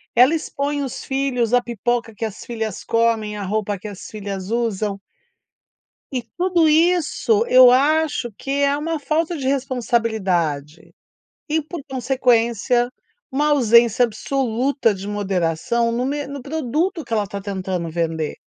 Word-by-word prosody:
ela 250 +6 +6
expõe 290 -2 -2
os 265 -3 -5
filhos, 265 -4 -1
a 245 - +5
pipoca 235 0 -2
que 225 - -3
as 215 -2 -7
filhas 220 -4 -4
comem, 225 -2 +1
a 200 - -4
roupa 205 +1 -1
que 210 +3 -9
as 200 -2 -9
filhas 200 -2 -6
usam. 215 -4 -1 1.1
E, 250 - -1 0.2
tudo 350 -3 +3
isso, 350 +7 +3
eu 255 -1 +8
acho 290 -1 +2
que 270 - -6
é 280 0 +3
uma 320 +2 -2
falta 320 +3 0
de 270 - -4
responsabilidade. 220 - -1 0.6
E 315 +1 +1
por 315 +1 -7
consequência, 245 -2 +1 0.4
uma 295 +3 +1
ausência 235 -3 +5
absoluta 245 +1 0
de 195 0 -8
moderação 205 +3 0
no 245 +2 -1
me 285 +1 -2
no 280 -1 -7
produto 315 +5 -2
que 235 - -6
ela 215 -2 +2
está 200 0 -6
tentando 190 -3 -3
vender. 160 -2 -2
240 Hz, 145 wpm, -21 LUFS, 210-280 Hz, 1.1 s, eu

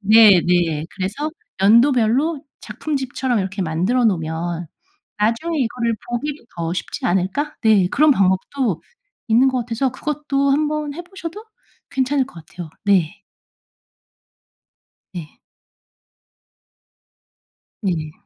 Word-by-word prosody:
네네. 180 -7 +5
그래서 210 +12 -3 0.3
연도별로 250 +7 +4 0.2
작품집처럼 260 0 -2
이렇게 190 +1 -4
만들어 185 +10 +1
놓으면 170 -2 -1 0.5
나중에 235 +10 0
이거를 235 -2 0
보기도 280 +3 -4
더 165 0 -2
쉽지 - - -4
않을까? 190 +12 0
네. 205 -5 +4
그런 305 0 +4
방법도 190 - 0 0.5
있는 245 +4 +5
것 260 -1 0
같아서 240 +3 -1
그것도 280 -1 -1
1 300 +1 +2
번 300 -1 -3
해 345 - -6
보셔도 385 +3 -8 0.5
괜찮을 265 0 +1
것 165 -11 -13
같아요. 170 -3 -9
네. 200 -1 +2 1.9
네. 165 -4 -8 2.4
네. 165 -6 -2
230 Hz, 225 characters per minute, -20 LUFS, 185-280 Hz, 2.4 s, 네네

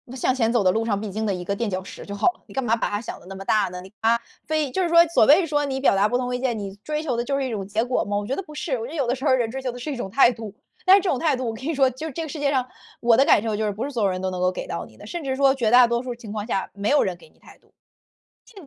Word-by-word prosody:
向 260 0 +1
前 230 -3 +1
走 235 -3 +2
的 185 - +4
路 225 +2 -1
上 205 -3 0
必 215 -1 -5
经 220 +3 -3
的 200 - 0
一 180 -1 -5
个 200 - -1
垫 230 0 -2
脚 185 0 -2
石 - - -10
就 200 - -7
好 205 - +1
了。 - - -28
你 - - -13
干 270 - -1
嘛 230 -1 +2
把 230 - -2
它 205 0 -2
想 230 - -7
得 - - -18
那 195 - -8
么 195 0 -8
大 205 -4 +2
呢？ 180 0 -7
你 190 - -13
它 230 +1 +3 0.3
非 310 -2 0
就 375 - 0
是 345 - 0
说 335 0 +7
所 330 -9 +4
谓 320 - +6
说 295 -2 0
你 265 -1 -2
表 265 - +3
达 200 +2 +3
不 245 - +1
同 250 0 -2
意 - - -3
见， 245 -3 -1
你 195 -1 -6
追 305 0 -2
求 280 -6 -2
的 235 - -1
就 275 +2 -1
是 270 - -1
一 - - -3
种 200 -4 -3
结 215 +3 -1
果 250 - 0
吗？ 205 0 -2
我 205 - -2
觉 270 - -1
得 390 - -4
不 305 - -13
是。 300 -1 -4
我 230 - -5
觉 - - -8
得 - - -7
有 265 -4 0
的 245 - +1
时 265 +2 -7
候 280 - +4
人 240 -3 +1
追 265 +3 -5
求 255 -2 -2
的 245 - -9
是 295 +4 -4
一 - - -3
种 240 -5 -5
态 255 0 +5
度， 220 -3 -8 0.3
但 375 +1 +8
是 400 - +4
这 370 - -1
种 260 - +1
态 305 -3 +1
度 250 -1 -3
我 225 - -2
跟 225 - -10
你 325 - -1
说 270 -2 +3
就 260 +5 -7
是 - - -6
这 330 - -4
个 - - -5
世 310 - -6
界 285 -1 +1
上， 260 -3 +1 0.3
我 235 -1 +4
的 270 - +6
感 205 - +5
受 220 -2 -2
就 215 - -1
是 210 - 0
不 210 +5 -5
是 - - -4
所 235 -5 -1
有 195 - +3
人 185 0 -3
都 190 - -1
能 180 -1 -4
够 185 - +3
给 - - -6
到 - - -4
你 - - -18
的。 - - -12
甚 345 -3 -5
至 265 -1 -1
说 275 0 +4
绝 235 -4 0
大 245 -1 +7
多 235 +1 -1
数 250 -1 -4
情 230 -3 -10
况 210 -1 -4
下， 195 -5 -2
没 200 +1 -2
有 290 0 +4
人 185 - -2
给 160 - -18
你 - - -30
态 - - -17
度， - - -32 0.7
其 455 - -20
实 385 - -10
240 Hz, 420 characters per minute, -23 LUFS, 205-275 Hz, 0.7 s, 但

